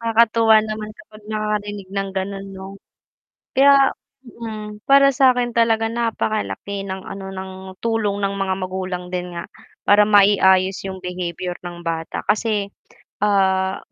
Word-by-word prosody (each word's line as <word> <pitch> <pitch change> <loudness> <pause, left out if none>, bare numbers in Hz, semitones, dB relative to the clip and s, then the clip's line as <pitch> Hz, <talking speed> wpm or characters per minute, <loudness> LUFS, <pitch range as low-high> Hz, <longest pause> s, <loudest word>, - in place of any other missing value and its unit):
Nakakatuwa 230 -1 +4
naman 215 0 -5
kapag 215 -11 -16
nakakarinig 210 -2 -3
ng 195 0 -2
ganun 195 +1 -3
'no? 190 0 -8 0.9
Kaya 275 0 +6 0.3
hmm, 215 -4 -8
para 275 0 +6
sakin 250 -3 +3
talaga 225 -1 +2
napakalaki 215 -3 -2
ng 190 0 -5
ano 195 0 -8
ng 190 0 -6 0.3
tulong 215 -3 0
ng 200 0 0
mga 190 -1 0
magulang 185 -1 -4
din 180 -1 -4
nga. 170 - -7 0.3
Para 205 0 +5
mai-ayos 195 -2 +4
yung 190 -1 -6
behavior 180 0 -4
ng 175 0 -7
bata 165 -1 -3
kasi, 210 -2 +1 0.5
ah, 190 -2 +2
200 Hz, 130 wpm, -21 LUFS, 190-225 Hz, 0.9 s, Kaya